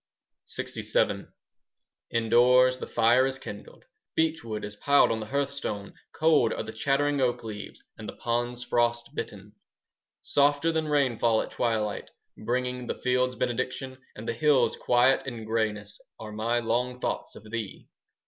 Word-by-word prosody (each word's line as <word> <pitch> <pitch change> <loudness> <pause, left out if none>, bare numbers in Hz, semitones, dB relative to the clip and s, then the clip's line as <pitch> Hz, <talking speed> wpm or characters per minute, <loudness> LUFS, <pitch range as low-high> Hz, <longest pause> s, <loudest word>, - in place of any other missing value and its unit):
20 - - -4
LXVII - - +1 0.8
Indoors 125 +3 +4
the - - -5
fire 120 +3 +4
is 135 0 -3
kindled; 105 -5 -10 0.3
Beechwood 135 -10 -1
is 105 0 -8
piled 140 +5 +4
on 110 - -1
the 110 - -6
hearthstone; 140 -6 -3 0.2
Cold 155 -7 +3
are - - -3
the 110 - -7
chattering 140 +5 +1
oak 120 -2 +1
leaves; 105 -2 -8 0.2
And - - -6
the - - -8
ponds 120 +1 -2
frost 120 -1 0
bitten. - - -6 0.7
Softer 145 +3 +3
than 160 -1 -1
rainfall 120 -6 +2
at - - -10
twilight, 110 -3 -1 0.3
5 - - -13
Bringing 125 +1 -1
the - - -2
fields 125 0 +1
benediction 130 +2 -3 0.2
And 110 +2 -8
the 115 - 0
hills 145 +3 +3
quiet 130 +2 +3
and 115 -4 -5
greyness, 110 -2 -2 0.2
Are 110 -1 -7
my 110 +3 0
long 120 +2 -1
thoughts - - -3
of 110 0 -13
thee. 115 -4 -5
120 Hz, 150 wpm, -27 LUFS, 110-130 Hz, 0.8 s, Indoors